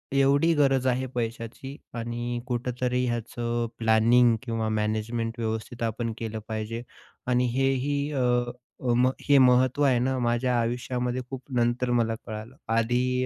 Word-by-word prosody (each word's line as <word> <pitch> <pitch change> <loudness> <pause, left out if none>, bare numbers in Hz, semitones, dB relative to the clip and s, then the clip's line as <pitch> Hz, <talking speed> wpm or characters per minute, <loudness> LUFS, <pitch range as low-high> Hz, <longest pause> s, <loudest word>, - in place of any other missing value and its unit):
एवढी 140 +4 +4
गरज 135 -3 +3
आहे 130 +1 +1
पैशाची 115 +3 -4 0.2
आणि 120 +1 -3
कुठेतरी 125 0 -1
ह्याचं 120 0 -2
प्लॅनिंग 115 +1 +4
किंवा 115 -3 -2
मॅनेजमेंट 110 +2 -2
व्यवस्थित 110 +1 -3
आपण 115 +1 -2
केलं 110 -1 -4
पाहिजे 110 +1 -4 0.5
आणि 125 0 +2
हे 135 +1 +2
ही 140 +2 -1
अ, 140 - -1 0.6
अ, 125 -2 0
मग 125 +2 +4 0.2
हे 140 - +7
महत्त्व 130 +1 +4
आहे 130 -4 +4
ना, 130 +2 0
माझ्या 120 +1 +1
आयुष्यामध्ये 125 +1 -1
खूप 135 -1 -6
नंतर 120 +1 +1
मला 115 -2 +2
कळालं. 110 +3 -7 0.2
आधी 125 +2 +1
120 Hz, 140 wpm, -26 LUFS, 115-130 Hz, 0.6 s, हे